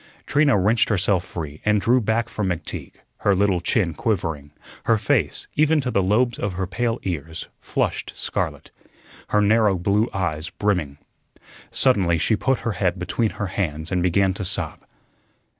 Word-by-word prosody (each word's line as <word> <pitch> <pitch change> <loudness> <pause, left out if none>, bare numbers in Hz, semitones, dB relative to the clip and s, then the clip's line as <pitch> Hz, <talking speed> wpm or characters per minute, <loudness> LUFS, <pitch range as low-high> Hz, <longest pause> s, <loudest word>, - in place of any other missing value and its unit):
Trina 145 -4 +3
wrenched 110 +4 +2
herself 95 -3 +2
free 80 -4 -7
and 105 0 +3
drew 125 +5 +3
back 115 +2 0
from 105 -4 -3
McTeague, 90 -3 -4 0.2
her 100 - +2
little 95 -2 +2
chin 90 -2 +1
quivering; 80 - -2 0.4
her 115 - +4
face, 105 -1 0
even 155 +1 +3
to 130 -3 -2
the 100 - +2
lobes 115 +6 +1
of 100 -2 -2
her 95 +1 -2
pale 115 +5 -1
ears, 80 -2 -5
flushed - - -2
scarlet; - - -3 0.6
her 105 - +2
narrow 105 -2 +3
blue 100 +6 +1
eyes 85 -4 -2
brimming. 90 -10 -1 0.7
Suddenly 95 -10 +3
she 110 - +2
put 135 +4 0
her 115 - -1
head 95 -2 0
between 90 +6 -1
her 100 - -2
hands 80 -3 -2
and 90 -1 +1
began 95 +2 +2
to 100 - -5
sob. 90 - -2
100 Hz, 160 wpm, -23 LUFS, 90-110 Hz, 0.7 s, her